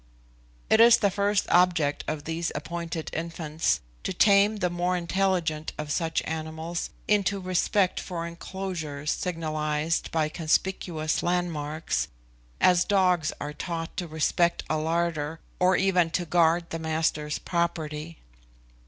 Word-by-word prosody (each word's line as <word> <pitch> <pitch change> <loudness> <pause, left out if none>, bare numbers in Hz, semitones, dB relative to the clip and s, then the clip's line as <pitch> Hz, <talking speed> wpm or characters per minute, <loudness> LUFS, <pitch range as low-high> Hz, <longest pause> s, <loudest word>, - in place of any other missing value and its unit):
It 220 - +4
is 235 0 +8
the 200 -4 +2
first 200 +1 +1
object 175 -5 +3
of 150 -2 -3
these 165 +1 -2
appointed 165 +1 -4
infants, 160 - -1 0.2
to - - -3
tame 200 +2 +5
the 180 -4 0
more 175 +1 0
intelligent 175 -3 0
of 150 -1 -4
such 160 0 0
animals 160 +2 -4 0.2
into 200 -1 +2
respect 185 +1 +1
for 170 -2 -4
enclosures 170 -4 -4
signalised 155 -2 -1
by 160 -2 +1
conspicuous 160 0 0
landmarks, 165 -3 -1 0.5
as 180 -1 +5
dogs 180 -6 +2
are 145 0 -5
taught 165 0 -5
to 175 - -2
respect 170 +2 +1
a 155 - +2
larder, 160 -1 -1 0.2
or 180 +1 +4
even 180 -3 +3
to 175 +1 -1
guard 170 0 +2
the 165 - -3
master's 160 -1 -1
property. 165 -2 -2
170 Hz, 125 wpm, -27 LUFS, 155-180 Hz, 0.5 s, is